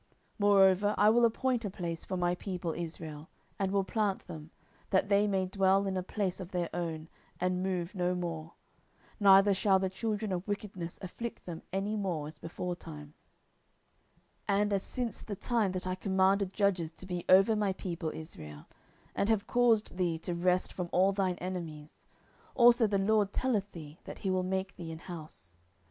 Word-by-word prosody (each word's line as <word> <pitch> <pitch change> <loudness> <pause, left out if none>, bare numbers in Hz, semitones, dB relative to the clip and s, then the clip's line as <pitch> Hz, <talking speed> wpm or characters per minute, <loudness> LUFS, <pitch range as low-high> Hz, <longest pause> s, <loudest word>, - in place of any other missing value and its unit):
10:007:010 - - -39 0.3
Moreover 200 0 +5
I 210 - +6
will 240 +1 +5
appoint 245 +1 +1
a 205 - -2
place 170 -3 -5
for 185 - -3
my 175 0 +1
people 180 -2 -4
Israel, 160 -2 -6 0.3
and 195 -1 0
will 200 -1 +2
plant 205 -1 -1
them, 155 -1 -9 0.4
that 195 +1 +2
they 205 +1 +4
may 190 -2 +1
dwell 195 +1 +2
in 190 -1 -1
a 185 - 0
place 190 0 -2
of 180 -2 -7
their 175 -3 -2
own, 165 -2 -3 0.3
and 180 0 0
move 185 -2 -2
no 180 -2 0
more; 165 -2 -4 0.7
neither 195 0 +7
shall 195 0 +3
the 190 -1 -1
children 215 0 -2
of 180 +1 -3
wickedness 200 -4 -4
afflict 230 +6 -6
them 170 -2 -6
any 195 +3 -1
more, 180 -8 -2
as 150 0 -11
beforetime, 165 -4 -6 1.4
10:007:011 200 0 +3
And 205 0 -1
as 195 - +1
since 245 0 -4
the 205 - -5
time 220 -1 +1
that 185 0 -2
I 185 - -1
commanded 190 0 +2
judges 190 -6 +1
to 185 - -9
be 180 -2 -4
over 195 +4 +6
my 210 -2 +1
people 175 -4 -4
Israel, 75 - -8 0.5
and 200 - 0
have 215 -3 +2
caused 230 -6 +2
thee 175 -3 +1
to 175 +2 -4
rest 180 +1 +1
from 180 -2 -4
all 190 +2 +4
thine 190 -2 0
enemies. 165 -5 -7 0.5
Also 240 -2 +6
the 200 -1 +1
LORD 205 0 +2
telleth 215 -6 0
thee 155 -1 -10
that - - -8
he 190 - +2
will 185 0 +1
make 190 +1 -2
thee 170 -3 -6
an 160 - -6
house. 155 - -10
185 Hz, 185 wpm, -31 LUFS, 175-200 Hz, 1.4 s, neither